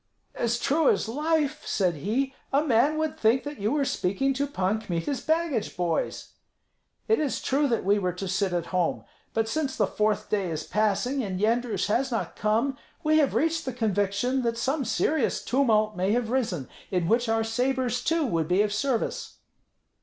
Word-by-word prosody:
"As 235 0 0
true 295 +5 +2
as - - +1
life," 300 +3 0
said 185 -4 +1
he, 235 - -1 0.2
"a 280 +2 +3
man 285 +2 +3
would 315 -1 -2
think 230 +4 +3
that 290 0 -7
you 210 +3 0
were 290 -1 +1
speaking 265 +6 0
to 280 +2 -1
Pan 215 -4 -1
Kmita's 205 - -3
baggage 315 - -1
boys. 175 -2 -1 0.8
It 445 - +3
is 295 -4 -1
true 285 +2 +1
that 230 -7 -1
we 205 +1 +3
were 180 -2 -1
to 190 +2 -5
sit 190 +1 0
at 175 -1 -1
home; 180 -2 0 0.3
but 225 0 +1
since 280 +2 -1
the 210 - +3
fourth 210 +1 0
day 200 -4 0
is 155 -1 -3
passing 215 +6 0
and 190 -5 -3
Yendrus 220 -2 +1
has 250 +6 +1
not 230 - -3
come, 230 +6 0 0.2
we 310 0 +4
have 285 -3 +2
reached 325 0 +1
the 260 - -4
conviction 220 +3 0
that 230 -1 -1
some 270 +4 -1
serious 275 +4 +1
tumult 220 -5 +2
may 190 +3 +1
have 235 -1 0
risen, 205 - -1 0.2
in 180 -3 0
which 235 +3 +2
our 225 0 +2
sabres, 245 +1 0
too, 330 -1 +1
would 165 - 0
be 185 +4 +3
of 210 -1 -1
service." 240 +2 -2
230 Hz, 185 wpm, -26 LUFS, 205-275 Hz, 0.8 s, we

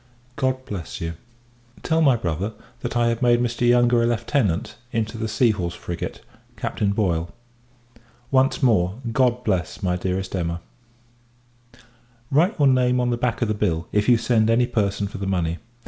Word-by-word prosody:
God 130 0 -1
bless 90 -6 -6
you! 85 0 -3 0.7
Tell 160 0 +1
my 140 -5 +5
brother, 95 0 -2 0.3
that 120 - -3
I 120 0 +3
have 115 +1 -2
made 120 -1 +4
Mr. 120 0 +1
Yonge 120 0 +4
a - - +5
Lieutenant, 115 - 0 0.2
into 115 -1 -2
the 110 0 -3
Sea 110 +2 +3
horse 90 -4 -3
frigate, 85 -1 -6 0.4
Captain 100 - -1
Boyle. 85 -6 0 1.0
Once 135 +2 +2
more, 95 -6 +3 0.2
God 125 0 +2
bless 95 -2 -2
my 90 -1 +1
dearest 95 +1 -3
Emma! 85 -1 -2 1.7
Write 165 +9 +3
your 145 -3 +4
name 125 -1 +3
on 125 0 +1
the - - +1
back 120 0 -1
of - - 0
the 110 - 0
bill, 85 -6 -1
if 105 +3 +1
you 120 - +6
send 115 -1 +2
any 120 +2 +4
person 100 -4 -1
for 100 - -8
the 100 - -3
money. 85 -3 -1
110 Hz, 170 wpm, -23 LUFS, 95-125 Hz, 1.7 s, you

